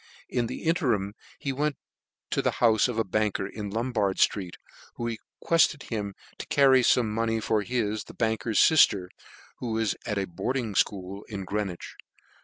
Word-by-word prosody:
In 120 Hz, -2 st, 0 dB
the -, -, -6 dB
interim 125 Hz, -, +1 dB, 0.2 s
he 140 Hz, -, -3 dB
went 145 Hz, +2 st, -1 dB, 0.5 s
to -, -, +1 dB
the -, -, 0 dB
houfe 110 Hz, -2 st, +4 dB
of 120 Hz, -3 st, -4 dB
a 115 Hz, -, +2 dB
banker 105 Hz, 0 st, 0 dB
in 105 Hz, +1 st, -6 dB
Lombard 110 Hz, -3 st, -1 dB
ftreet, 95 Hz, -4 st, +1 dB, 0.4 s
who 120 Hz, -1 st, -3 dB, 0.3 s
requefted 165 Hz, -3 st, +3 dB
him 100 Hz, -3 st, -3 dB, 0.2 s
to -, -, -6 dB
carry 140 Hz, -4 st, +5 dB
fome 125 Hz, 0 st, +4 dB
money 115 Hz, +1 st, 0 dB
to 110 Hz, 0 st, 0 dB
his 110 Hz, -1 st, -2 dB
(the -, -, -13 dB
banker's 110 Hz, 0 st, 0 dB
filter, 100 Hz, -, +5 dB, 0.5 s
who 120 Hz, -3 st, -3 dB
was 110 Hz, -3 st, 0 dB
at 105 Hz, -3 st, -1 dB
a 100 Hz, -, 0 dB
boarding 115 Hz, +5 st, -3 dB
fchool 95 Hz, 0 st, -1 dB
at 100 Hz, -2 st, -5 dB
Greenwich. 100 Hz, -3 st, -4 dB
110 Hz, 165 wpm, -27 LUFS, 100-125 Hz, 0.5 s, carry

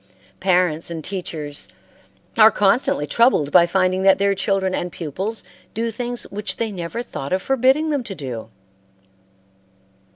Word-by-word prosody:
Parents 180 Hz, -4 st, +1 dB
and 165 Hz, -2 st, -5 dB
teachers 155 Hz, -6 st, -5 dB, 0.7 s
are 220 Hz, -1 st, +8 dB
constantly 205 Hz, -, +2 dB
troubled 155 Hz, -, +3 dB
by 175 Hz, -1 st, +6 dB
finding 185 Hz, +1 st, +1 dB
that 190 Hz, 0 st, +5 dB
their 200 Hz, 0 st, +2 dB
children 195 Hz, -1 st, 0 dB
and 180 Hz, -1 st, -2 dB
pupils 190 Hz, +9 st, -4 dB, 0.3 s
do 230 Hz, +1 st, -1 dB
things 245 Hz, +1 st, -3 dB
which 210 Hz, +1 st, -3 dB
they 225 Hz, -2 st, -2 dB
never 185 Hz, +5 st, -5 dB
thought 140 Hz, -, -7 dB
of 185 Hz, -, 0 dB
forbidding 270 Hz, +4 st, +2 dB
them 285 Hz, -4 st, 0 dB
to 195 Hz, -, -6 dB
do. 125 Hz, -7 st, -6 dB
190 Hz, 140 wpm, -21 LUFS, 170-225 Hz, 0.7 s, are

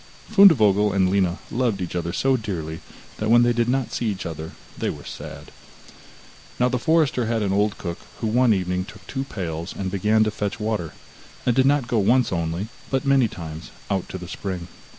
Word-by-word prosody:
Fundevogel 110 Hz, -, +6 dB
and 95 Hz, -2 st, +3 dB
Lina 95 Hz, -2 st, +2 dB
loved 120 Hz, -4 st, 0 dB
each 90 Hz, -1 st, -4 dB
other 85 Hz, -1 st, -2 dB
so 135 Hz, +8 st, +2 dB
dearly 85 Hz, -9 st, -4 dB, 0.4 s
that 110 Hz, -, -2 dB
when 120 Hz, +1 st, +6 dB
they 120 Hz, 0 st, +3 dB
did 120 Hz, 0 st, +1 dB
not 130 Hz, -1 st, 0 dB
see 120 Hz, -, -1 dB
each 100 Hz, -3 st, -3 dB
other 80 Hz, -1 st, -6 dB, 0.2 s
they -, -, -2 dB
were -, -, -7 dB
sad. -, -, -9 dB, 1.1 s
Now 125 Hz, 0 st, +3 dB
the 125 Hz, -1 st, -1 dB
forester 155 Hz, -5 st, +2 dB
had 115 Hz, -1 st, 0 dB
an 95 Hz, -1 st, 0 dB
old 105 Hz, +1 st, +1 dB
cook, 85 Hz, -2 st, -5 dB, 0.2 s
who -, -, -3 dB
one 120 Hz, +2 st, +3 dB
evening 90 Hz, -2 st, 0 dB
took -, -, -13 dB
two 135 Hz, 0 st, -4 dB
pails 85 Hz, -, -5 dB
and 95 Hz, -1 st, -3 dB
began 105 Hz, +3 st, +3 dB
to 110 Hz, -, 0 dB
fetch 105 Hz, -1 st, -3 dB
water, 105 Hz, -7 st, -2 dB, 0.5 s
and 120 Hz, -, +2 dB
did 130 Hz, 0 st, +4 dB
not 140 Hz, -3 st, +2 dB
go 115 Hz, -2 st, +1 dB
once 120 Hz, +2 st, +3 dB
only, 85 Hz, +4 st, -2 dB, 0.2 s
but 135 Hz, 0 st, 0 dB
many 135 Hz, -3 st, +4 dB
times, 80 Hz, -4 st, -8 dB, 0.2 s
out 95 Hz, -2 st, -1 dB
to -, -, -5 dB
the 90 Hz, -1 st, -8 dB
spring. 90 Hz, -1 st, -5 dB
105 Hz, 200 wpm, -23 LUFS, 90-120 Hz, 1.1 s, Fundevogel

